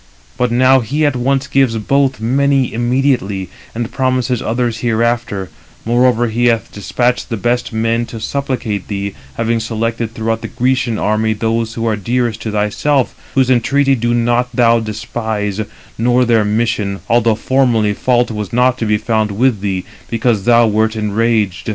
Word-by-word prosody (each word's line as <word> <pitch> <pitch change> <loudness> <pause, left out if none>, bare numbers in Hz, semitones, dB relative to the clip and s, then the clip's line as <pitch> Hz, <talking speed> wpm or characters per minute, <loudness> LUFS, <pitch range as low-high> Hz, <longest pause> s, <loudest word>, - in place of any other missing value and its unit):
But 125 -1 0
now 130 +2 +5
he 145 +6 -1
at 145 -3 +1
once 135 +2 0
gives 130 -4 +1
both 135 +4 +1
many 135 +3 +1
immediately, 120 -6 0 0.3
and 115 0 -3
promises 130 -2 0
others 120 0 -1
hereafter; 115 -4 -1 0.3
moreover, 120 0 +2
he 120 +2 0
hath 115 -1 0
despatched 120 +5 -1
the 115 - -2
best 120 +3 -1
men 115 +1 0
to 115 - -8
supplicate 125 -6 -3
thee, 100 -1 -3 0.2
having 115 0 0
selected 115 0 -2
throughout 115 0 -2
the - - -5
Grecian 125 -2 0
army 110 +1 +1
those 115 +1 -2
who 115 - -2
are 110 -2 +1
dearest 115 +2 -1
to 110 - -4
thyself; 110 +6 0 0.2
whose 130 -1 +3
entreaty 135 +3 +2
do 120 -1 0
not 120 +1 +1
thou 115 -1 +4
despise, 110 -1 -3 0.4
nor 125 +2 +3
their 115 -2 +3
mission, 105 -2 -1
although 115 -1 +3
formerly 115 -3 +1
fault 120 +2 +1
was 105 -2 -5
not 125 +1 +2
to 115 - -1
be 105 0 +2
found 110 0 0
with 110 +2 +1
thee, 95 -3 -2 0.2
because 115 -3 0
thou 120 -1 +5
wert 110 +1 +1
enraged. 110 -2 0
115 Hz, 160 wpm, -16 LUFS, 110-125 Hz, 0.4 s, now